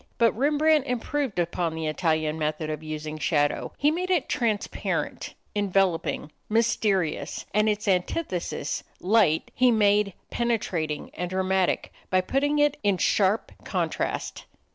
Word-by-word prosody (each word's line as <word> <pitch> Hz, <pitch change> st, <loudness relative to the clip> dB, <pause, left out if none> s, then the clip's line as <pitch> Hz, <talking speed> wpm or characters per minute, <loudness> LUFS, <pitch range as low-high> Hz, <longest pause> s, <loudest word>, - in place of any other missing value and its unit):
But 230 Hz, -1 st, +3 dB
Rembrandt 295 Hz, +2 st, +3 dB
improved 250 Hz, 0 st, -2 dB
upon 170 Hz, -1 st, -1 dB
the 160 Hz, 0 st, -3 dB
Italian 155 Hz, 0 st, 0 dB
method 155 Hz, 0 st, -2 dB
of 155 Hz, 0 st, -4 dB
using 155 Hz, 0 st, -5 dB
shadow. 145 Hz, -3 st, +1 dB
He 295 Hz, +2 st, +3 dB
made 360 Hz, +3 st, -2 dB
it 355 Hz, -7 st, +2 dB
transparent, 220 Hz, -4 st, -2 dB, 0.2 s
enveloping, 195 Hz, -6 st, 0 dB, 0.2 s
mysterious. 210 Hz, -6 st, 0 dB
And 210 Hz, +1 st, +3 dB
its 210 Hz, 0 st, -2 dB
antithesis, 185 Hz, -, -1 dB, 0.2 s
light, 190 Hz, -5 st, +3 dB
he 255 Hz, 0 st, +4 dB
made 210 Hz, -3 st, +3 dB, 0.2 s
penetrating 180 Hz, -11 st, -1 dB
and 180 Hz, +1 st, -4 dB
dramatic 190 Hz, 0 st, 0 dB, 0.2 s
by 185 Hz, 0 st, +3 dB
putting 285 Hz, +9 st, 0 dB
it 295 Hz, -1 st, +3 dB
in 200 Hz, -2 st, +2 dB
sharp 200 Hz, +3 st, +2 dB
contrast. -, -, -2 dB
195 Hz, 125 wpm, -26 LUFS, 165-235 Hz, 0.2 s, he